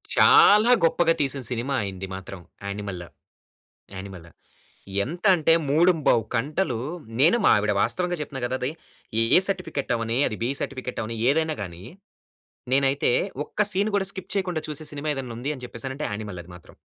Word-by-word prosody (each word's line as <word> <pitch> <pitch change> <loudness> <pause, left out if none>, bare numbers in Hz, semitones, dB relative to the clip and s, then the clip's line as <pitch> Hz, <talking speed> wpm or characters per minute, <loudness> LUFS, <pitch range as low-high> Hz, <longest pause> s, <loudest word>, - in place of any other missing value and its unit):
చాలా 215 +4 +7
గొప్పగా 165 0 +3
తీసిన 135 -1 -1
సినిమాయింది 110 -7 -3
మాత్రం 95 0 -8 0.3
యానిమల్‌. 100 -4 -5 0.9
యానిమల్ 95 -3 -9 0.7
ఎంతంటే 170 - +2 0.2
3:15 155 - +3
కంటలు 140 +1 -1 0.4
నేను 165 - +5
మా - - +6
ఆవిడ 105 0 +1
వాస్తవంగా 180 -1 0
చెప్తున్నా 135 -3 -6
కదా! 130 +1 -2
అది. 130 +4 -1 0.5
ఏ 115 - +5
సర్టిఫికేట్ 185 -9 -3
అవ్వని, 115 +1 -2
అది 110 - -4
బి 120 - 0
సర్టిఫికేట్ 130 -2 -5
అవ్వని 115 +1 -5
ఏదైనా 160 +1 +1
గాని, 90 -2 -7 0.9
నేనైతే 135 -1 +2 0.3
ఒక్క 210 - -1
సీన్ 200 +2 +1
కూడా 195 -1 0
స్కిప్ 190 -1 -8
చేయకుండా 180 -5 -1
చూసే 150 +1 -2
సినిమా 150 +1 -3
ఏదైనా 130 -4 -6
ఉంది 135 +4 -3
అని 125 - -10
చెప్పేసనంటే 130 +5 -5
యానిమల్ 105 -4 -6
అది 90 - -14
మాత్రం. 85 - -18
135 Hz, 145 wpm, -24 LUFS, 110-165 Hz, 0.9 s, చాలా